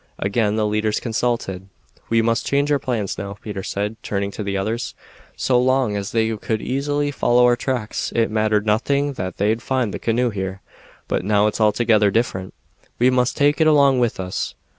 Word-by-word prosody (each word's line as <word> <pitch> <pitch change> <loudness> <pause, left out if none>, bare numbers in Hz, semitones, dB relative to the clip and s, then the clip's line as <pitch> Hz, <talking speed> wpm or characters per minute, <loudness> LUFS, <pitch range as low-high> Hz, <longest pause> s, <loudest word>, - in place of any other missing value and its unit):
Again 105 +1 0
the 110 -1 +1
leaders 105 0 0
consulted. 115 -5 -2 0.4
"We 115 0 +3
must 115 0 +1
change 140 +1 +1
our 145 - +3
plans, 115 -8 -2
now," 100 0 -5
Peter 100 -3 -6
said, 105 +3 -3
turning 100 0 -2
to 105 - -6
the 100 -1 -2
others. 110 +4 -3 0.4
"So 125 -2 +2
long 130 -3 +2
as 100 -1 -3
they 110 -1 +1
could 110 +1 -2
easily 145 +4 -1
follow 125 -3 +3
our 120 0 +5
tracks 120 -3 -3
it 115 -2 +2
mattered 110 -1 +1
nothing 140 +7 +1
that 95 -8 -5
they'd 110 +3 +1
find 125 -4 -1
the - - -4
canoe 120 +1 +1
here; 95 -1 -5 0.4
but - - -1
now 105 +1 +3
it's 105 +1 -1
altogether 110 -1 +3
different. 95 -4 -2 0.4
We 125 +2 +4
must 125 0 +1
take 145 +2 +3
it 160 - +5
along 140 -4 +5
with 120 -5 0
us." 90 -1 -3
110 Hz, 185 wpm, -21 LUFS, 105-125 Hz, 0.4 s, our